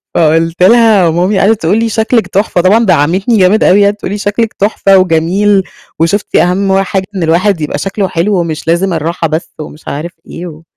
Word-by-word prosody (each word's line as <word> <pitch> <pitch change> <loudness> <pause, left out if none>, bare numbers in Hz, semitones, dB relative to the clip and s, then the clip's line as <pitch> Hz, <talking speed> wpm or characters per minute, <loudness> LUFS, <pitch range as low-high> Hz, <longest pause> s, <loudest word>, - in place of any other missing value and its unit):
فقلت 165 +2 +1
لها 220 -3 +4
ومامي 180 +5 0
قعدت 215 +2 +1
تقول 175 +7 +1
لي: 230 0 -1
"شكلِك 220 +1 0
تحفة"، 195 -3 -1
طبعًا 215 +6 +2
دعمتني 185 +6 +1
جامد 190 +3 +3
أوي، 200 +2 +4
قعدت 205 +1 -1
تقول 185 - -6
لي: 205 - -3
"شكلِك 210 +2 -2
تحفة 195 -1 +1
وجميل، 185 +3 +1 0.4
وشفتِ 185 +6 -1
أهم 190 +2 +1
حاجة 190 0 -3
إن 185 - -2
الواحد 170 +2 +1
يبقى 150 -1 -3
شكله 195 +4 -3
حلو 180 +2 -1
ومش 165 -2 -4
لازم 175 +2 0
الراحة 165 +1 -2
بس."، 160 +2 -4
ومش 150 +1 -12
عارف 160 +5 -5 0.2
إيه 175 +2 -8
و 160 -1 -12
185 Hz, 190 wpm, -11 LUFS, 165-205 Hz, 0.4 s, لها